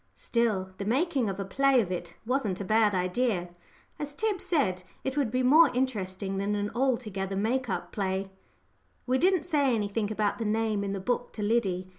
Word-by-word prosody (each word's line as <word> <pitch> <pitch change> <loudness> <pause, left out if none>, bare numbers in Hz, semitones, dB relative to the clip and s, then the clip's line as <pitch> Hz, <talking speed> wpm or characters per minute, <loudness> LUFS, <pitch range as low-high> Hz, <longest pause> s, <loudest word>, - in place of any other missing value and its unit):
Still, 215 -6 0
the - - -2
making 260 - +1
a 195 - -3
play 270 +6 +3
of 195 -6 0
it 175 -1 -5
wasn't 230 -7 0
a 200 - -4
bad 215 0 +3
idea. 185 0 0 0.5
As 290 -1 -5
Tib 425 -1 -1
said, 190 - +1 0.2
it 265 0 -2
would 280 -5 +1
be 255 +3 0
more 300 +5 +7
interesting 195 -6 -2
than 205 +1 0
an 205 0 -2
altogether 225 -7 -1
make 235 +5 0
up 175 -2 -3
play. 195 -1 -2 0.7
We 255 +1 +1
didn't 365 -2 +3
say 285 -7 +2
anything 210 0 -1
about 215 0 0
the 225 - -2
name 215 -1 0
in 200 0 -2
the 195 - -3
book 245 +5 -2
to 210 - -4
Liddy. 200 -5 0
215 Hz, 185 wpm, -28 LUFS, 195-260 Hz, 0.7 s, more